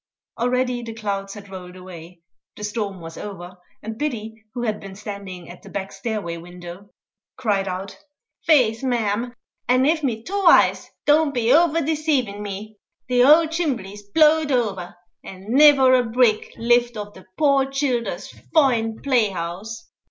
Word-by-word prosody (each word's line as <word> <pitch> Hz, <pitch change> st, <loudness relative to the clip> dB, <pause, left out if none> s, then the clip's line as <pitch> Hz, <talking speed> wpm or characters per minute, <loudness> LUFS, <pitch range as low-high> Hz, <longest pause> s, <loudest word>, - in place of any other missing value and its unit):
Already 250 Hz, 0 st, 0 dB
the 230 Hz, -1 st, -7 dB
clouds 200 Hz, -2 st, -4 dB
had 205 Hz, -1 st, -11 dB
rolled 180 Hz, -1 st, -9 dB
away; 180 Hz, -2 st, -12 dB, 0.3 s
the 210 Hz, -, -9 dB
storm 205 Hz, -3 st, -3 dB
was 165 Hz, 0 st, -9 dB
over; 185 Hz, -3 st, -8 dB, 0.3 s
and 220 Hz, +1 st, -6 dB
Biddy, 230 Hz, -7 st, -3 dB, 0.2 s
who 240 Hz, -, -3 dB
had 215 Hz, -3 st, -1 dB
been 195 Hz, -1 st, -10 dB
standing 200 Hz, -3 st, -8 dB
at 175 Hz, -, -12 dB
the -, -, -13 dB
back 195 Hz, -1 st, -5 dB
stairway 195 Hz, -5 st, -4 dB
window, 175 Hz, +3 st, -11 dB, 0.5 s
cried 205 Hz, -6 st, 0 dB
out, 190 Hz, +1 st, -5 dB, 0.5 s
"Feth, 250 Hz, -8 st, +4 dB
mem, 240 Hz, -2 st, -1 dB, 0.3 s
an' 255 Hz, +2 st, +4 dB
av 315 Hz, 0 st, +1 dB
me 225 Hz, -5 st, -2 dB
two 400 Hz, +5 st, -3 dB
eyes -, -, +5 dB, 0.2 s
don't 295 Hz, -1 st, +3 dB
be 235 Hz, 0 st, +2 dB
afther 330 Hz, +1 st, +4 dB
desavin' 290 Hz, -9 st, 0 dB
me, 205 Hz, +1 st, -7 dB, 0.3 s
the 250 Hz, 0 st, +3 dB
owld 310 Hz, +5 st, +6 dB
chimbley's 245 Hz, -, -3 dB
blowed 305 Hz, +8 st, +3 dB
over, 200 Hz, -9 st, -1 dB, 0.3 s
an' 190 Hz, 0 st, -11 dB
niver 275 Hz, -2 st, +7 dB
a 250 Hz, -1 st, +4 dB
brick 230 Hz, -2 st, +2 dB
lift 240 Hz, 0 st, +2 dB
o' 205 Hz, 0 st, -6 dB
the 190 Hz, -2 st, -15 dB
poor 275 Hz, -3 st, +3 dB
childer's 270 Hz, -4 st, -2 dB, 0.3 s
foine 235 Hz, -7 st, +2 dB
play 245 Hz, -6 st, +2 dB
house." 190 Hz, -, -6 dB
225 Hz, 155 wpm, -22 LUFS, 195-260 Hz, 0.5 s, niver